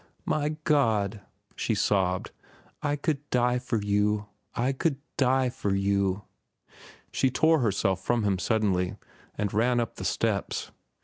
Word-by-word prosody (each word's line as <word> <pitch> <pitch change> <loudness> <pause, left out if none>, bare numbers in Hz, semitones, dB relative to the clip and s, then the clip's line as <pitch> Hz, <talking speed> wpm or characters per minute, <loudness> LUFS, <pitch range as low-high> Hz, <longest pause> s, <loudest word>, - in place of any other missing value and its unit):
"My 150 0 0
God!" 110 - +2 0.3
she 110 - 0
sobbed. 95 -2 +1 0.5
"I 145 0 0
could 145 -1 -2
die 125 0 +2
for 125 -2 -1
you. 105 +1 +1 0.3
I 125 +3 +1
could 135 +1 0 0.2
die 130 -1 +3
for 100 -6 -1
you." 100 0 +1 0.9
She 130 - +2
tore 160 +5 +4
herself 100 -4 +1
from 120 -2 +1
him 100 -3 +1
suddenly 95 -4 +1 0.4
and 100 -1 -1
ran 120 +3 +3
up 115 -3 -3
the - - -6
steps. - - -1
110 Hz, 135 wpm, -27 LUFS, 100-130 Hz, 0.9 s, tore